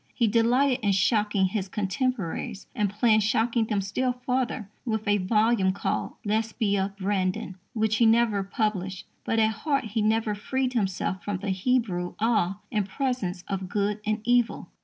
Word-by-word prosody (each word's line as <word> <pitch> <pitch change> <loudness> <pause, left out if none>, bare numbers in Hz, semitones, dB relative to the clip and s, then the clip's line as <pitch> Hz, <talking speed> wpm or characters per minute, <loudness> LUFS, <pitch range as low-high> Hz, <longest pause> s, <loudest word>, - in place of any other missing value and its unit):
He 235 - +2
delighted 245 +4 +3
in 200 -1 +3
shocking 205 0 +2
his 190 0 -2
contemporaries, 210 0 -2
and 210 -1 0
planned 215 +2 +3
shocking 225 +2 +1
them 210 -2 0
still 250 +6 -1
further 250 -5 -1 0.2
with 220 -3 -2
a 205 0 +3
volume 210 0 +2
called - - -2
Lesbia 205 -2 0
Brandon, 190 -1 -1 0.2
which 220 -2 +1
he 230 - +5
never 225 -3 +3
published; 195 -4 -2 0.2
but 225 - -1
at 220 0 +4
heart 275 +6 -1
he 220 0 -2
never 220 0 +1
freed 255 +5 -2
himself 190 -4 -1
from 205 0 -2
the 195 +1 -3
Hebrew 190 -3 0
awe 210 -4 +1
in 210 -2 0
presence 200 -6 -2
of 190 -2 -3
good 205 +1 0
and 215 +1 -1
evil. 245 -1 +1
215 Hz, 160 wpm, -26 LUFS, 195-230 Hz, 0.2 s, he